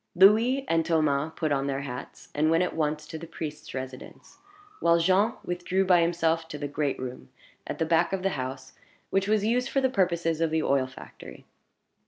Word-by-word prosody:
Louis 225 +9 +5
and 165 0 +2
Thomas 155 -2 +1
put 155 -3 -1
on 140 -1 +1
their 135 0 -2
hats, 125 -3 -8
and 155 +2 +2
went 165 +2 +3
at 180 - -3
once 150 -1 -1
to 160 +1 -7
the 165 - -9
priest's 155 -2 -7
residence; 130 -1 -8 0.4
while 170 0 +4
Jean 190 +7 +3
withdrew 180 +2 0
by 180 -2 +5
himself 165 -1 +1
to 150 - -6
the 145 0 -4
great 145 0 -1
room 125 - -7 0.4
at - - -4
the 160 - 0
back 160 0 +2
of 190 -1 -2
the 195 - +2
house, 130 -3 -5 0.4
which 195 0 +1
was 210 -1 +2
used 250 +4 +1
for 275 - +1
the 260 -1 +1
purposes 170 -5 +1
of 165 - +2
the 160 0 0
oil 135 -2 +2
factory. 130 - -12
165 Hz, 200 wpm, -27 LUFS, 145-185 Hz, 0.4 s, Louis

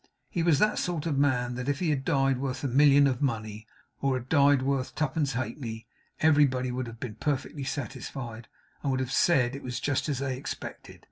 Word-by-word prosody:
He 170 - -1
was 165 -3 +4
that 210 +7 +2
sort 170 -4 -2
of 145 -4 0
man 125 -4 +2
that 125 +2 -3
if 145 - 0
he 165 -2 0
had 135 -3 -1
died 135 -1 +2
worth 135 0 -3
a - - +1
million 140 +2 +6
of 130 -2 0
money, 110 -5 -2 0.3
or 135 -1 +2
had 130 0 -5
died 140 -3 +4
worth 135 -1 -1
twopence 145 -2 0
halfpenny, 115 -2 -4 0.4
everybody 140 -5 +3
would 125 0 -3
have 115 0 -10
been 120 -3 -5
perfectly 145 -1 -2
satisfied, 130 -4 -5 0.3
and 140 - -1
would 130 -1 +1
have 130 0 -2
said 130 -7 +3
it 140 - -7
was 125 -1 -4
just 145 +1 -1
as 140 - 0
they 135 -1 -2
expected. 130 - -7
135 Hz, 205 wpm, -28 LUFS, 125-145 Hz, 0.4 s, million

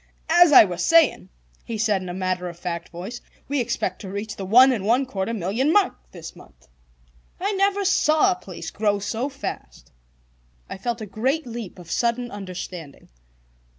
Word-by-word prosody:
"As 345 -1 +7
I 280 - +10
was 180 -3 -4
saying," 325 - +4 0.3
he 230 - -5
said 210 -3 +1
in 185 - -7
a - - -4
matter 185 -1 -2
of 170 - -11
fact 170 -1 -5
voice, 190 +8 -8 0.3
"we 285 0 -1
expect 230 -6 -2
to 195 - -7
reach 205 +2 -5
the 195 - -6
one 255 +6 +7
and 225 -7 -2
one 240 +6 +2
quarter 200 -4 -3
million 225 - 0
mark 405 +1 +3 0.2
this 165 -3 -10
month. - - -18 0.7
I 395 +3 -1
never 395 0 +1
saw 360 0 +3
a - - 0
place 180 - -9
grow 205 -1 0
so 225 +6 -3
fast." 275 0 -8 0.8
I - - -7
felt 235 +2 -3
a - - -4
great 260 +10 -1
leap 230 -6 -7
of 175 -2 -11
sudden 240 +1 0
understanding. 185 -6 -8
220 Hz, 180 wpm, -23 LUFS, 185-270 Hz, 0.8 s, I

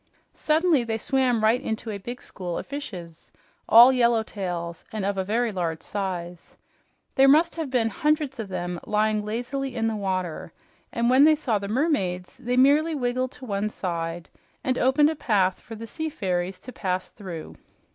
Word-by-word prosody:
Suddenly 315 -3 +2
they 225 -1 -2
swam 250 -2 +1
right 230 +4 +3
into 220 -3 -4
a 200 - -5
big 240 +6 -7
school 180 -3 -5
of - - -5
fishes, 185 - -8 0.4
all 240 +3 +9
yellowtails 200 -8 -1
and 215 -3 -3
of 200 0 -1
very 230 +2 +1
large 170 -4 -3
size. 180 -4 -5 0.6
There 270 0 +5
must 315 +5 +5
have 320 -4 -4
been 240 -3 +1
hundreds 300 -3 0
of 220 - -4
them 175 -1 -4
lying 215 0 +1
lazily 245 +5 -3
in 225 -2 0
the 225 -1 0
water, 185 -5 -3 0.4
and 235 0 0
when 260 +3 +6
they 310 +1 +7
saw 245 -8 0
the 200 - -5
mermaids 200 - -1
they 245 +1 -1
merely 295 +5 +4
wriggled 255 -1 -1
to 260 - -11
one 205 -1 -1
side 170 -3 -4 0.4
and 255 -1 0
opened 290 +4 +4
a - - -4
path 195 -8 +1
for 225 - -9
the 225 +1 -7
sea 315 +7 -3
fairies 185 -6 -2
to 255 - -10
pass 185 -1 -2
through. 175 -6 -8
225 Hz, 175 wpm, -25 LUFS, 185-260 Hz, 0.6 s, all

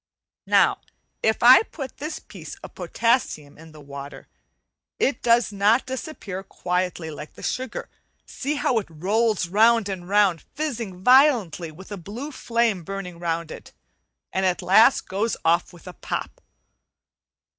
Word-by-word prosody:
Now - - +4 0.4
if 220 +1 +1
I 250 +2 +9
put 280 - -8
this 300 +3 -5
piece - - -10
of - - -10
potassium 230 - -1
on 160 0 -13
the 155 - -14
water 140 0 -10 0.7
it 275 - 0
does 235 -1 +3
not 205 +5 +3
disappear 255 -7 -6
quietly 180 -3 -3
like 150 0 -9
the - - -12
sugar. 255 -2 -3 0.4
See 285 +2 -3
how 250 -4 +1
it 205 - -8
rolls 200 +4 0
round 220 +3 +4
and 180 -2 -6
round, 200 -5 +3
fizzing 230 -11 -4
violently 245 - +4
with 185 +6 -14
a 205 - -4
blue 220 - -7
flame 230 -7 0
burning 180 -1 -6
round 170 -1 -2
it, - - -11 0.6
and 190 - 0
at 185 -1 0
last 220 +7 +5
goes 210 +4 -1
off 170 +2 +2
with 175 -2 -16
a 180 - -7
pop. - - -5
200 Hz, 145 wpm, -24 LUFS, 175-235 Hz, 0.7 s, I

